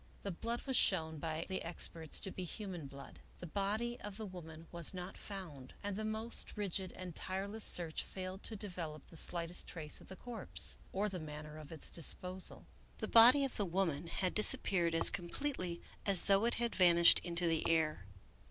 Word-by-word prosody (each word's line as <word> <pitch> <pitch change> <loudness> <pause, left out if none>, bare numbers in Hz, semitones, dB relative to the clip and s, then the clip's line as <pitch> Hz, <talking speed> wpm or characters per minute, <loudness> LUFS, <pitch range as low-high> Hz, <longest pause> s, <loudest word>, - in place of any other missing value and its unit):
The 200 - -3
blood 230 +7 -4
was 265 -2 -2
shown 160 -8 +2
by 160 +1 -3
the 190 - -4
experts 165 -2 -2
to 190 - -2
be 185 - -6
human 180 -4 -6
blood. 140 0 -12 0.2
The - - -9
body 210 +7 -2
of 205 -1 -7
the 220 - -6
woman 165 -4 -10
was 170 +1 -4
not 180 +1 -7
found, 165 -10 -9
and 205 -1 -3
the 215 - -4
most 220 +1 -2
rigid 190 -2 -3
and 180 -3 -8
tireless 200 +3 -4
search 165 -3 +1
failed 185 +1 -7
to 225 - -4
develop 175 -7 -6
the - - -17
slightest 170 +1 -1
trace 155 -3 -4
of - - -15
the 190 - -9
corpse, 235 -1 -6
or 200 +2 -1
the 190 -3 -5
manner 150 -1 -8
of 150 0 -12
its 160 - -4
disposal. 180 +3 -3 0.3
The - - -4
body 250 +5 +7
of 270 - -6
the 205 - 0
woman 170 -4 -1
had 185 +2 -1
disappeared 175 -5 +6
as 165 - +11
completely 180 -2 -4 0.2
as 195 -4 +5
though 200 +2 +3
it 235 - +1
had 235 0 -1
vanished 170 -2 +7
into 170 0 -2
the 165 0 0
air. 155 - +1
180 Hz, 190 wpm, -35 LUFS, 165-205 Hz, 0.3 s, as